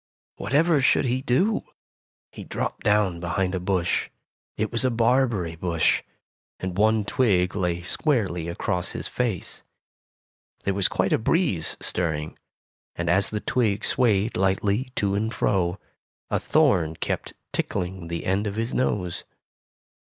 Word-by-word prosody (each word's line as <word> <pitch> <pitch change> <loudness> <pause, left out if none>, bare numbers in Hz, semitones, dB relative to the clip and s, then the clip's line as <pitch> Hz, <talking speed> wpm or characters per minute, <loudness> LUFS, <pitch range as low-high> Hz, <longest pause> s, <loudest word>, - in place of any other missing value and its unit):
Whatever 150 +2 +2
should 140 - +3
he 130 +1 0
do? 165 - +2 0.7
He - - -9
dropped - - -4
down 105 -4 +2
behind 90 +2 -1
a 95 - -1
bush. 90 -1 0 0.5
It 110 0 -1
was 115 +1 +3
a 130 - +3
barberry 115 -7 +1
bush, 85 -1 +1 0.6
and 95 -1 -4
one 110 +1 +3
twig 100 -8 +2
lay 90 -3 -1
squarely 95 - 0
across 90 +2 -2
his - - -4
face. 115 -9 -2 1.0
There 100 - 0
was 100 -1 +4
quite - - 0
a - - +3
breeze 110 - 0
stirring, 80 -3 -2 0.6
and 85 -1 0
as 95 +3 +3
the 105 -1 -3
twig 110 -6 0
swayed 110 -4 +2
lightly 100 +6 +1
to 100 -1 +1
and 110 +3 0
fro, 90 -4 +1 0.5
a - - +2
thorn 80 -2 +2
kept - - -3 0.2
tickling 90 -1 -2
the 85 0 -4
end 100 +3 +1
of 100 - -4
his 115 +2 -2
nose. 90 -8 0
100 Hz, 140 wpm, -25 LUFS, 90-115 Hz, 1.0 s, was